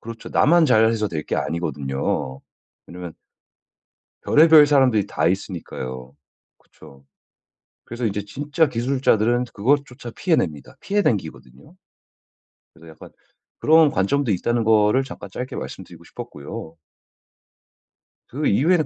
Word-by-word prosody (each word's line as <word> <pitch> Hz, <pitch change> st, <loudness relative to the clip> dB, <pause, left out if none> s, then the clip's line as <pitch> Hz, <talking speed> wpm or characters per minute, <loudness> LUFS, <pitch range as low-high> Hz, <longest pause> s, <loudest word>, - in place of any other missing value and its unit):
그렇죠. 115 Hz, 0 st, -9 dB
나만 170 Hz, +4 st, +4 dB
잘해서 110 Hz, -3 st, +2 dB
될 75 Hz, -4 st, -5 dB
게 -, -, -2 dB
아니거든요. 70 Hz, -4 st, -3 dB, 0.5 s
왜냐면 90 Hz, -1 st, -9 dB, 1.1 s
별의별 155 Hz, 0 st, +6 dB
사람들이 130 Hz, -8 st, +3 dB
다 -, -, 0 dB
있으니까요. 70 Hz, -9 st, -5 dB, 0.4 s
그쵸. 70 Hz, 0 st, -18 dB, 0.8 s
그래서 120 Hz, +1 st, -5 dB
이제 105 Hz, -1 st, -2 dB
진짜 145 Hz, -, 0 dB
기술자들은 120 Hz, -2 st, +1 dB
그것조차 125 Hz, +1 st, -1 dB
피해 170 Hz, +6 st, 0 dB
냅니다. 75 Hz, -, -4 dB
피해 205 Hz, +1 st, 0 dB
댕기거든요. 100 Hz, -, -4 dB, 1.0 s
그래서 85 Hz, 0 st, -17 dB
약간 80 Hz, -, -14 dB, 0.5 s
그런 160 Hz, -1 st, +5 dB
관점도 120 Hz, +7 st, 0 dB
있다는 120 Hz, +5 st, 0 dB
거를 110 Hz, +3 st, +3 dB
잠깐 105 Hz, -, -10 dB
짧게 125 Hz, +7 st, -6 dB
말씀드리고 -, -, -9 dB
싶었고요. 75 Hz, +3 st, -9 dB, 1.5 s
그 145 Hz, +4 st, -2 dB
이후에는 155 Hz, -, +2 dB
115 Hz, 300 characters per minute, -22 LUFS, 90-140 Hz, 1.5 s, 별의별